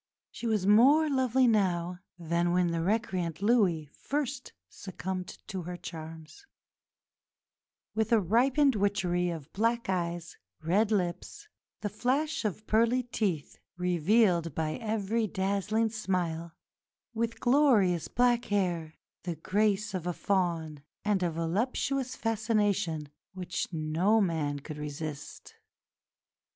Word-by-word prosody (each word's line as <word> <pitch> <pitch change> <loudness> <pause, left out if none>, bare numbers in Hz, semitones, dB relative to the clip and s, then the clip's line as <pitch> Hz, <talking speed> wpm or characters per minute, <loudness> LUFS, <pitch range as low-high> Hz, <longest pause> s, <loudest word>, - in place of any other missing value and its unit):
She 235 - -5
was 215 -4 +1
more 265 +10 +6
lovely 260 -1 +3
now 180 -6 +1 0.2
than 170 0 0
when 180 -1 +2
the 165 0 -1
recreant 185 -3 -1
Louis 200 -9 +3
first 280 -2 -3 0.2
succumbed 185 -1 -6 0.2
to 190 -1 -5
her 175 +1 -6
charms 160 - -9 1.5
with 220 +1 0
a 230 - +6
ripened 255 - +3
witchery 185 -3 +1
of 160 -3 -7
black 230 +1 0
eyes, 170 -2 -2 0.3
red 200 +7 +2
lips, 205 - -2 0.3
the 210 - -2
flash 275 +9 0
of 215 +1 -3
pearly 230 +3 +2
teeth 200 -10 -2 0.2
revealed 180 0 +2
by 155 -1 -1
every 220 0 -1
dazzling 200 +4 0
smile, 175 -6 -2 0.6
with 230 0 -2
glorious 240 - +3
black 245 -1 +2
hair, 175 -6 -1 0.3
the 175 -2 -4
grace 205 +5 0
of 180 -2 -3
a 175 - 0
fawn, 170 -6 -1 0.2
and 205 -2 +2
a 175 - +1
"voluptuous 245 - -1
fascination" 210 -9 0 0.3
which 180 -1 -3
no 165 +7 +2
man 160 -7 0
could 150 +1 -8
resist. 150 0 -7
195 Hz, 115 wpm, -29 LUFS, 170-225 Hz, 1.5 s, more